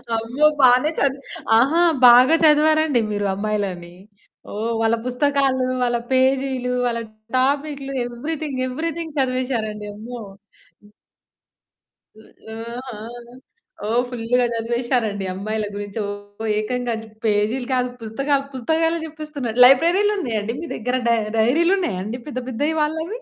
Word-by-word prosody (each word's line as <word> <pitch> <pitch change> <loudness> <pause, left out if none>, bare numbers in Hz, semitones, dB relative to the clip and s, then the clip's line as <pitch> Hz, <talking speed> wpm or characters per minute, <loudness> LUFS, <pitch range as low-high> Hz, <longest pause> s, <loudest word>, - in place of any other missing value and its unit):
అమ్మో! 240 +7 0 0.2
బానే 255 +4 +5
చదివి 275 0 0 0.3
ఆహా! 290 +9 +3 0.3
బాగా 250 +6 +7
చదివారండి 305 -3 +4
మీరు 205 -1 -1
అమ్మాయిలని. 195 -4 -3 0.6
ఓహ్! 225 +3 -2
వాళ్ళ 225 +1 +3
పుస్తకాలు, 265 0 +1 0.2
వాళ్ళ 240 -1 +1
పేజీలు, 260 -1 +1
వాళ్ళ 235 -1 -2 0.4
టాపిక్లు 275 +1 -1
ఎవ్రీథింగ్ 280 +2 -4
ఎవ్రీథింగ్ 320 +3 -4
చదివేసారండి. 245 -5 -2
అమ్మో! 235 +3 -8 0.6
హ్మ్. 205 - -20 1.2
హ్మ్, 220 - -18 0.2
ఆహా! 235 0 -7 0.9
ఓ - - -3 0.2
ఫుల్‌గా 245 +1 0
చదివేసారండి 230 -3 -1
అమ్మాయిల 215 +3 -3
గురించి. 205 +1 -6 0.4
ఓ - - -4
ఏకంగా 245 +2 -2 0.3
పేజీలు 220 +4 +1
కాదు, 250 -1 +1
పుస్తకాలు. 275 +5 -1
పుస్తకాలే 325 +6 0
చెప్పేస్తున్నారు. 300 -6 -6
లైబ్రరీలు 345 +11 +5
ఉన్నాయండి 225 - -2
మీ 335 - -6
దగ్గర? 250 +3 -1
డై 235 - +4 0.2
డైరీలు 315 - +3
ఉన్నాయండి? 220 - -3
పెద్ద 255 - -4
పెద్దవి 290 +6 -1
వాళ్ళవి? 320 +10 -2
250 Hz, 115 wpm, -21 LUFS, 225-290 Hz, 1.2 s, బాగా